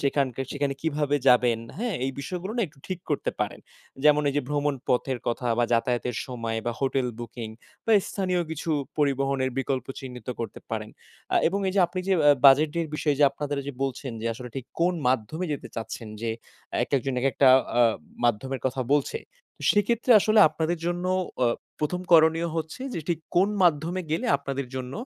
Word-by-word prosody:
সেখানকার 135 -2 0
সেখানে 140 -1 -1
কিভাবে 150 -2 +1
যাবেন, 120 -2 +5 0.2
হ্যাঁ? 235 -2 -1
এই 135 - -1
বিষয়গুলো 180 +7 -5
না 235 - +2
একটু 150 -2 -20
ঠিক 185 -2 -3
করতে 145 - 0
পারেন। - - -2 0.4
যেমন 150 0 +6
এই 140 - -1
যে 145 - +2
ভ্রমণ 145 -1 0
পথের 125 0 +1
কথা 120 +1 -1
বা, 120 - +4
যাতায়াতের 120 0 0
সময় 115 -3 -3
বা, 120 - +1
hotel 135 -1 +1
booking 115 -1 -7 0.3
বা, 225 - +4 0.2
স্থানীয় 185 -3 0
কিছু 160 +1 -4 0.3
পরিবহনের 135 -2 +1
বিকল্প 135 0 -1
চিহ্নিত 125 -3 -9
করতে 115 - -5
পারেন। 110 -1 -3 0.4
আ - - +5
এবং 195 - -1
এই - - -1
যে 195 - +4
আপনি 185 +2 -4
যে 195 - +4 0.2
আ - - +9 0.2
বাজেটের 155 +4 +5
বিষয়ে 150 -2 0
যে 145 - +8
আপনাদের 145 0 -4 0.3
বলছেন 135 -1 -3
যে - - -2
আসলে 125 +1 -8
ঠিক 130 - -5
কোন 180 +1 +3
মাধ্যমে 130 +7 -1
যেতে 145 - -5
চাচ্ছেন, 115 0 -5
যে 115 0 -1 0.5
একেকজন 135 -1 -1
একেকটা 135 +1 +4 0.3
আ - - +7 0.4
মাধ্যমের 125 +3 0
কথা 130 0 -2
বলছে। 150 - 0 0.5
সেক্ষেত্রে 230 +4 +1
আসলে 215 +2 +3
আপনাদের 160 +2 -2
জন্য 175 +1 -1 0.4
আ - - +4 0.3
প্রথম 180 +4 -1
করণীয় 165 +1 +5
হচ্ছে 160 +9 -4
যে - - -2
ঠিক 170 -2 +1 0.2
কোন 190 +3 +5
মাধ্যমে 170 +2 +2
গেলে 160 - 0
আপনাদের 140 -1 -4
জন্য 130 0 -5
140 Hz, 175 wpm, -26 LUFS, 125-165 Hz, 0.5 s, আ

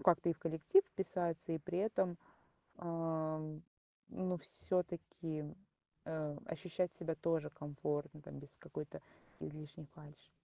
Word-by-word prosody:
как-то 175 -1 +6
и - - +7
в - - -10
коллектив 165 - +6
вписаться, 175 - 0
и 160 - +2
при 175 +4 -1
этом, 190 -4 +3 0.6
а, 165 -2 +1 0.7
ну, 185 -1 +1
всё-таки, 165 -1 -1 0.6
э, 155 -2 -1
ощущать 180 +1 0
себя 165 -2 -1
тоже 165 -2 +2
комфортно 145 +1 -2
там, 70 - -7
без - - -8
какой-то, - - -5 0.4
излишней 150 0 -6
фальши? 150 -3 -13
165 Hz, 120 wpm, -40 LUFS, 155-175 Hz, 0.7 s, и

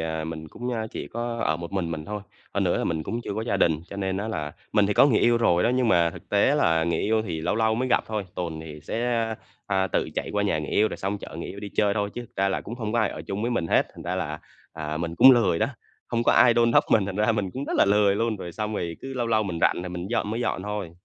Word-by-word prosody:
à, 80 -1 -2
mình 80 -1 -6
cũng, 120 +8 -6
ơ, 110 -1 -2
chỉ - - -6
có 120 0 -4
ở 80 - +1
một 85 +2 -8
mình 90 -4 -1
mình 80 -1 -4
thôi. 105 0 -5 0.3
Hơn - - +1
nữa - - +2
là - - -1
mình 80 -2 -1
cũng 115 +8 -3
chưa - - -4
có 110 - -2
gia - - 0
đình. 80 -2 +2
Cho 100 - -6
nên 95 -1 -1
á, 105 +3 -3
là 75 -8 -3 0.2
mình 105 -2 +4
thì 105 - +1
có - - +7
người 115 -7 +3
yêu 120 0 +4
rồi 90 -6 +3
đó, - - +3
nhưng 125 -1 +2
mà 85 -4 +4
thực 90 - -13
tế 105 +8 +3
là 80 - +3
người 85 -1 0
yêu 110 +1 +1
thì 80 -7 -4
lâu - - 0
lâu 110 0 +2
mới 130 +3 -1
gặp - - +2
thôi. 105 -2 -3
Tuần 85 -3 -4
thì 75 -1 -9
sẽ, 115 - -3
a, 115 -1 -1 0.3
à, 95 -1 +1
tự - - -1
chạy - - -3
qua 105 - +1
nhà 100 -6 +1
người 75 - -4
yêu 110 +1 +3
rồi - - -6
xong 100 +1 -3
chở 80 - -9
người 85 - -5
yêu 100 - -8
đi 105 - -5
chơi 105 -1 +2
thôi, 105 -1 -1
chứ - - -4
thực 120 - -13
ra 100 0 +2
là 95 - -1
cũng 115 - -7
hông 110 -3 -4
có 120 - +1
ai 110 -4 +3
ở 75 - -7
chung 100 +2 -3
với 120 - 0
mình 115 -8 0
hết. - - +3
Thành - - -10
ra 90 +1 -2
là, 75 -4 -3 0.3
à, 75 -1 -4
mình 85 0 -3
cũng 130 +9 +9
lười 105 -10 +4
đó, - - +2 0.4
hông 120 -1 0
có - - +4
ai 120 -2 +6
đôn 120 0 +4
đốc - - +5
mình 105 -4 +4
thành 100 -1 -4
ra 105 +2 +3
mình 100 -4 -1
cũng 135 +7 -5
rất - - -4
là - - +6
lười 100 0 +4
luôn, 115 0 0
rồi 90 -2 -7
xong 105 +2 -3
rồi 85 -4 -3
cứ 135 0 -7
lâu 120 -2 -1
lâu 110 -1 +2
mình 90 -5 -3
rảnh 90 - +2
rồi 90 - -5
mình 90 0 -5
dọn 105 - 0
mới 115 +2 -2
dọn 105 -5 -1
thôi. 105 -3 -4
100 Hz, 320 wpm, -25 LUFS, 85-115 Hz, 0.4 s, cũng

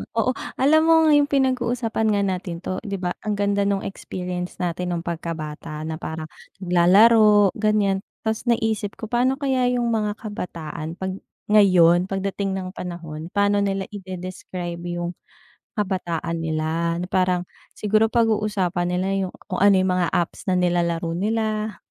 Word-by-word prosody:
oo 230 +3 +2 0.2
alam 305 +4 +4
mo 330 - +6 0.2
yung 290 -1 +5
pinag-uusapan 250 -5 0
nga 200 - +1
natin 180 -2 -3
'to 185 - -3
'di 200 -1 -3
ba 180 -1 -1
ang 210 -1 0
ganda 200 0 +1
nung 200 -1 0
experience 180 -2 -5
natin 180 0 -2
nung 170 - -4
pagkabata, 160 -2 -5
na 160 +1 -4
parang 160 0 -5 0.4
naglalaro, 205 +3 +6
ganyan, 210 -2 +2 0.2
'tas 220 +2 -2
naisip 220 -3 0
ko 220 0 -8
pa'no 255 +2 +2
kaya 265 -3 +1
yung 240 -1 0
mga 210 -2 0
kabataan 165 -6 -6
'pag 190 0 -3 0.3
ngayon, 185 -4 +5
pagdating 195 0 -2
ng 185 -1 -4
panahon, 165 -2 -7
pa, 200 +1 +2
no 205 - +2
nila 195 -1 -1
ide-describe 185 -2 -6 0.2
yung 175 0 -3 0.6
kabataan 175 -4 -2
nila 160 +1 -1
na - - -5
parang 180 -1 +2 0.3
siguro 215 +1 +2
pag-uusapan 210 -6 +1
nila 185 +1 0 0.2
yung - - -12
kung 185 - -4
ano 200 0 +6
yung 185 0 +2
mga 180 -2 +1
apps 175 +3 -2
na 185 - +3
nilalaro 170 -2 0
nila. 215 +1 -1
190 Hz, 150 wpm, -23 LUFS, 175-215 Hz, 0.6 s, mo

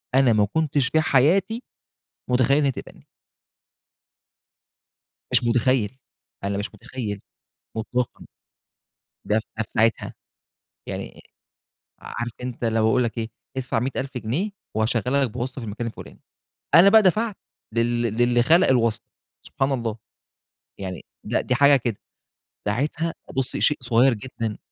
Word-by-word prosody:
أنا 130 -3 +5
ما 105 -1 +4
كنتش 150 -4 +2
في 155 +3 +2
حياتي 180 - +2 0.7
مُتخيِل 130 +3 +4
إن 150 - +2
هي 135 - +3
تقبلني. - - -11 2.2
مش - - +3
متخيِل. 120 0 +1 0.5
أنا 100 0 -1
مش 105 +1 -4
متخيِل 105 -6 -5 0.6
مطلقًا، 125 +2 -2 1.0
ده 105 - +2
ف - - -4
ده 115 - 0
في - - -24
ساعتها، 115 +1 +1 0.7
يعني - - -6 0.8
عارف 120 0 -5
أنت 125 -1 -5
اللي 115 -1 +1
هو 110 - +3
يقول 125 +3 +3
لِك 115 0 -3
إيه 115 -1 -2 0.3
ادفع 125 -3 -1
100.000 130 +1 -3
جنيه 135 - -2 0.2
وهاشغَّلك 125 +4 +1
بواسطة 125 +3 -4
في - - -6
المكان 110 +3 -4
الفُلاني. 115 - -10 0.6
أنا 175 +4 +9
بقى 220 +2 +7
دفعت 210 +3 +2 0.4
لل 120 +1 +1
للّي 120 +1 +2
خَلَق 170 +8 +5
الواسطة. 115 -4 +1 0.3
سبحان 135 +1 -2
الله! 115 -4 -2 0.8
يعني 95 -3 -6 0.2
لأ، - - 0
دي 125 - 0
حاجة 140 +2 +6
كده. 120 -4 -2 0.7
ساعتها، 150 +9 -1 0.2
بُصي، 135 0 -1
شيء 150 - +3
صغير 120 +2 +4
جدًا. 115 -1 -5
125 Hz, 135 wpm, -24 LUFS, 115-135 Hz, 2.2 s, أنا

